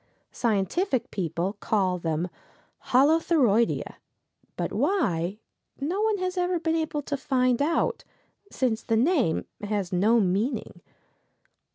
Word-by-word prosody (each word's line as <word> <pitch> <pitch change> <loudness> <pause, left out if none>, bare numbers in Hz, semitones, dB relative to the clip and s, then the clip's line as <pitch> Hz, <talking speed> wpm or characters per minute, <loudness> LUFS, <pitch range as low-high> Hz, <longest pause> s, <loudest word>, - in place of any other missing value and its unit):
Scientific 240 - 0
people 180 +1 -2
call 190 -5 0
them 165 +1 -1 0.6
Holothuroideæ, 270 - +3 0.7
but - - -2
why, 200 - 0 0.4
no 340 +9 -1
one 435 -1 +2
has 370 0 -3
ever 355 -1 0
been 325 0 0
able 315 -2 -2
to 285 - -2
find 255 -2 +1
out, 335 +10 0 0.5
since 235 -4 -1
the 225 - 0
name 250 - +2 0.2
has 205 -3 -2
no 215 +6 +4
meaning. 200 +6 -1
245 Hz, 110 wpm, -26 LUFS, 195-320 Hz, 0.7 s, no